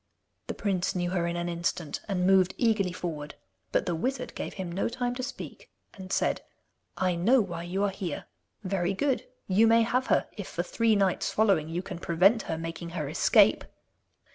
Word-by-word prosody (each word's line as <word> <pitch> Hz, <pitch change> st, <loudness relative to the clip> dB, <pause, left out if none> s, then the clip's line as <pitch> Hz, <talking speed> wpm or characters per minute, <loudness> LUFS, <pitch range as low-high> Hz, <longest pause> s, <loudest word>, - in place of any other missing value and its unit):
The -, -, -4 dB
prince 190 Hz, -3 st, -1 dB
knew 175 Hz, -1 st, -1 dB
her 175 Hz, -2 st, 0 dB
in 170 Hz, -, -2 dB
an 175 Hz, 0 st, -2 dB
instant, 170 Hz, -2 st, -2 dB
and 185 Hz, -3 st, 0 dB
moved 190 Hz, 0 st, +4 dB
eagerly 215 Hz, -6 st, +2 dB
forward; 150 Hz, -4 st, -5 dB, 0.4 s
but -, -, +1 dB
the 175 Hz, -, -1 dB
wizard 255 Hz, +12 st, -2 dB
gave -, -, -5 dB
him 185 Hz, -3 st, -5 dB
no 185 Hz, +6 st, -1 dB
time 245 Hz, 0 st, -2 dB
to 250 Hz, -, -4 dB
speak, 265 Hz, +2 st, -7 dB, 0.2 s
and 190 Hz, -1 st, -10 dB
said: -, -, +1 dB, 0.6 s
'I 185 Hz, -2 st, +1 dB
know 235 Hz, +10 st, +4 dB
why 175 Hz, -6 st, -2 dB
you 180 Hz, +3 st, -2 dB
are 200 Hz, -, +1 dB
here. 185 Hz, -5 st, -5 dB, 0.4 s
Very 190 Hz, -1 st, -1 dB
good; 270 Hz, +4 st, 0 dB, 0.2 s
you 205 Hz, +4 st, +4 dB
may 230 Hz, 0 st, +5 dB
have 255 Hz, +3 st, 0 dB
her -, -, +2 dB
if 205 Hz, -4 st, -6 dB
for 175 Hz, -, -3 dB
three 225 Hz, +4 st, +2 dB
nights 195 Hz, -3 st, +1 dB
following 195 Hz, -8 st, +2 dB
you 175 Hz, +3 st, -3 dB
can 185 Hz, -3 st, -7 dB
prevent 185 Hz, +7 st, +3 dB
her 160 Hz, -, -1 dB
making 165 Hz, +1 st, -5 dB
her 150 Hz, -3 st, -2 dB
escape. 150 Hz, -, +4 dB
185 Hz, 190 wpm, -28 LUFS, 170-215 Hz, 0.6 s, may